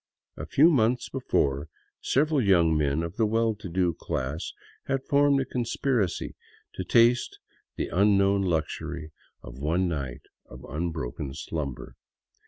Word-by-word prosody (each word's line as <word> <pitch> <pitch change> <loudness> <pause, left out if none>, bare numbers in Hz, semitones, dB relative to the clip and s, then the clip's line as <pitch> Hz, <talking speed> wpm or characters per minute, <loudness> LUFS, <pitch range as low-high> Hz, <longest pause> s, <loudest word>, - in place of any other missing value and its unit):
A 80 - -7
few 150 - +5
months 120 -3 +2
before, 75 - 0 0.3
several 150 +1 +2
young 85 -6 +4
men 75 +1 +1
of 85 +3 -6
the 110 -2 +3
well 115 +1 +1
to 105 -3 -9
do 90 0 +1
class 70 +1 -4 0.4
had 135 -1 -1
formed 140 -1 +4
a 135 - 0
conspiracy 120 -5 -1 0.4
to 95 - -4
taste 120 +6 +3 0.4
the - - -3
un 100 +3 +4
known 100 0 +3
luxury 80 -2 -2 0.3
of - - -10
one 85 +6 +1
night 70 -7 -4 0.2
of 65 +1 -12
unbroken 75 -4 -4
slumber. 70 -6 -5
90 Hz, 140 wpm, -27 LUFS, 75-115 Hz, 0.4 s, few